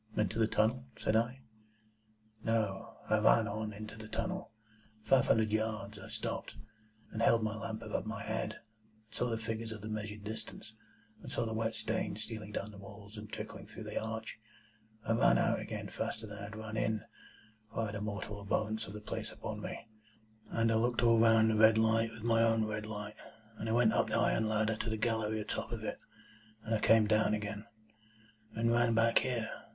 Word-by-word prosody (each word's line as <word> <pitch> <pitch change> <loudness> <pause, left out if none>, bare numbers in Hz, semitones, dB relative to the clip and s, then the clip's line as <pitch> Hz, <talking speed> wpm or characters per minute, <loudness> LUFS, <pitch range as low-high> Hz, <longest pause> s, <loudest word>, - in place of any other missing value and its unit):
"Into 105 +1 +1
the 110 - +4
tunnel?" 115 +4 +2
said 110 - +1
I. 120 +4 +1 1.0
"No. 110 -4 -1
I - - +3
ran - - +5
on 105 +1 -3
into 105 +1 -8
the 110 0 -9
tunnel, 185 - -3 0.5
five 135 +1 +4
hundred 110 -1 +3
yards. 110 -1 -1
I - - -9
stopped, - - -4 0.6
and 110 - -3
held 115 -1 +5
my 110 0 -1
lamp 110 0 -5
above 110 0 -3
my 110 -2 -4
head, 110 0 -2
and - - -14 0.5
saw 125 - -1
the 115 - 0
figures 110 0 -3
of 110 -2 -6
the 105 - -6
measured 105 -1 -4
distance, 110 +1 -7 0.5
and - - -8
saw - - 0
the 110 - -2
wet 110 0 -1
stains 110 -1 -2
stealing 110 -1 -6
down 105 0 -3
the 100 - -12
walls 100 +1 -11
and 105 -1 -8
trickling - - -6
through - - -7
the - - -3
arch. 110 0 -5 0.7
I 115 - +2
ran 115 - +5
out - - +2
again - - -5
faster 110 - -3
than 105 -1 -8
I - - -6
had 105 +2 -8
run 110 0 -5
in 110 0 0 0.7
(for - - -2
I - - +1
had 105 0 -4
a 105 - -3
mortal 105 0 -4
abhorrence 110 +2 -1
of 100 - -8
the 105 - -7
place 105 - -4
upon - - -5
me), - - -6 0.6
and 115 0 +2
I - - +3
looked 120 +1 +2
all 115 -1 +6
round 110 -1 +6
the 110 - +1
red 110 0 +7
light 110 0 +3
with 110 -1 -10
my 115 -1 +4
own 115 -1 +4
red 105 0 -3
light, 105 -1 -6 0.4
and 110 - -3
I - - +1
went 115 -1 +4
up - - +3
the - - +1
iron 110 -1 +2
ladder 110 0 +2
to 110 - -2
the 110 - -1
gallery 110 -1 0
atop - - -3
of - - -4
it, - - -3 0.6
and 115 - -2
I 110 - +3
came 110 0 +6
down 110 0 +3
again, 105 +1 -5 0.9
and 115 +1 +2
ran 120 -1 +3
back 115 0 +5
here. 120 -4 -1
110 Hz, 205 wpm, -34 LUFS, 105-115 Hz, 1.0 s, red